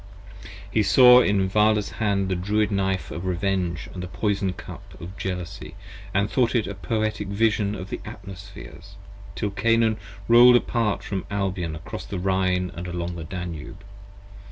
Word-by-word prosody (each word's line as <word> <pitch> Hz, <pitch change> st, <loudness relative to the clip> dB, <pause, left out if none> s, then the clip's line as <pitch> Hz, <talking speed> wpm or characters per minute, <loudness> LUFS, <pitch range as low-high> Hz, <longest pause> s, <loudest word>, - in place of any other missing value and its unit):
He 110 Hz, -, +2 dB
saw 125 Hz, +3 st, +7 dB
in 100 Hz, -4 st, +2 dB
Vala's 105 Hz, +1 st, +2 dB
hand 100 Hz, -3 st, +1 dB
the 95 Hz, -, 0 dB
Druid 105 Hz, +4 st, 0 dB
Knife 95 Hz, -1 st, -1 dB
of 85 Hz, -, -5 dB
Revenge 90 Hz, -2 st, -1 dB
& -, -, -14 dB
the 90 Hz, 0 st, -5 dB
Poison 100 Hz, 0 st, -1 dB
Cup 90 Hz, -, -9 dB
40 -, -, -13 dB
Of 95 Hz, +2 st, -10 dB
Jealousy, 90 Hz, -3 st, -5 dB, 0.4 s
and 100 Hz, +2 st, +1 dB
thought 125 Hz, +2 st, +1 dB
it 115 Hz, -3 st, +2 dB
a 100 Hz, -, -5 dB
Poetic 105 Hz, +3 st, -2 dB
Vision 105 Hz, 0 st, +1 dB
of 95 Hz, 0 st, -8 dB
the -, -, -4 dB
Atmospheres, 100 Hz, -2 st, -11 dB, 0.4 s
Till 105 Hz, -, -2 dB
Canaan 115 Hz, +1 st, +2 dB, 0.3 s
roll'd 120 Hz, +1 st, +8 dB
apart 115 Hz, -3 st, 0 dB
from 95 Hz, -3 st, -4 dB
Albion 95 Hz, -5 st, -2 dB
across 75 Hz, -, -8 dB
the 100 Hz, -, -4 dB
Rhine, 95 Hz, -1 st, 0 dB
along 85 Hz, 0 st, -4 dB
the 85 Hz, -, -6 dB
Danube. 85 Hz, -2 st, -7 dB
100 Hz, 155 wpm, -24 LUFS, 90-105 Hz, 0.4 s, roll'd